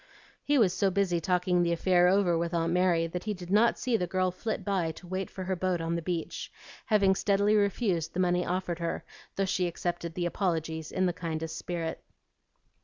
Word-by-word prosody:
He 290 0 +2
was 200 -8 +4
so 195 - +2
busy 185 -2 +1
talking 180 0 +2
the 170 -1 +2
affair 180 +1 +3
over 185 -2 +3
with 170 +1 -1
Aunt 165 0 +1
Mary 180 -2 +3
that 175 +3 -5
he 210 -1 -1
did 175 -1 -9
not 220 +3 +4
see 250 -2 0
the 180 - -2
girl 185 +1 +1
flit 215 +5 -4
by 190 -5 0
to 180 - -13
wait 185 +2 -3
for 190 - -6
her 190 +1 -1
boat 185 0 0
on 165 0 -2
the 170 - -1
beach, 170 -1 -4 0.4
having 200 -4 +4
steadily 200 +2 +2
refused 195 -5 0
the - - -1
money 180 -1 +2
offered 180 -1 -2
her, 170 -1 -3 0.3
though 195 - +1
she 185 -1 0
accepted 170 -1 -4
the 175 - -1
apologies 160 -3 -2
in 185 - +1
the 175 - +1
kindest 160 -2 -4
spirit. 170 -2 -4
180 Hz, 205 wpm, -29 LUFS, 170-190 Hz, 0.4 s, was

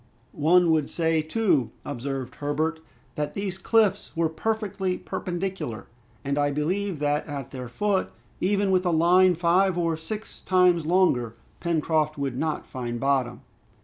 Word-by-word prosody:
"One 170 +3 +4
would 155 -3 +1
say 165 -1 +1
too," 155 - +1 0.2
observed 135 0 -4
Herbert, 155 +2 -1 0.3
"that 150 0 -3
these 195 -2 -3
cliffs 205 -2 +2
were 165 -1 +2
perfectly 195 0 -2
perpendicular; 180 - -4 0.4
and 140 +1 -1
I 145 0 +2
believe 175 +6 -1
that 145 0 0
at 140 -4 -6
their 125 -2 -6
foot, 195 - 0 0.3
even 200 +1 +1
with 185 -1 +3
a - - +3
line 175 +2 +5
five 175 +2 +2
or 165 -2 +1
six 210 +7 -7
times 180 -3 +3
longer, 135 -11 +2 0.2
Pencroft 155 -2 0
would 140 -3 -2
not 155 +4 -2
find 120 -2 -5
bottom." 130 -3 0
160 Hz, 145 wpm, -25 LUFS, 145-185 Hz, 0.4 s, line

